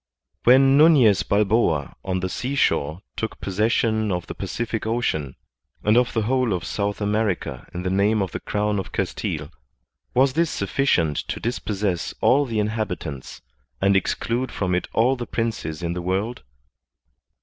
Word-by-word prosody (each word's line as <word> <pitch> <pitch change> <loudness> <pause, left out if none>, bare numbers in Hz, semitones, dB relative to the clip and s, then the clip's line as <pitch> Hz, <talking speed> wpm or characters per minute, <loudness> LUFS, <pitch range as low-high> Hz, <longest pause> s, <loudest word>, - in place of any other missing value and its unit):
When 135 +3 +6
Nufiez 135 - +6
Balboa 100 -8 +1
on 95 -1 -2
the 95 - -1
seashore 95 - 0
took 110 - -4
possession 110 +2 +1
of 90 -1 -2
the - - -6
Pacific 115 -2 -3
Ocean 80 - -1 0.5
and 105 +1 +3
of 125 0 +3
the 110 - +1
whole 125 -1 +1
of 90 -3 -2
South 100 0 -2
America 105 -2 -1
in 90 - -5
the 90 - -1
name 100 +3 +2
of 95 - -5
the - - -4
crown 105 0 -1
of 95 - -6
Castile, - - -3 0.6
was 130 +1 +4
this 165 +2 +2
sufficient 95 - +1
to - - -4
dispossess 105 -6 -2
all 140 +2 +4
the 115 -4 -3
inhabitants, 105 - -3 0.4
and 100 +1 +3
exclude 120 +6 0
from 90 -2 -1
it 90 - 0
all 125 +4 +3
the 120 -2 -6
princes 105 -9 -3
in 85 0 -1
the 90 - -4
world 95 +7 -2
105 Hz, 155 wpm, -23 LUFS, 95-120 Hz, 0.6 s, When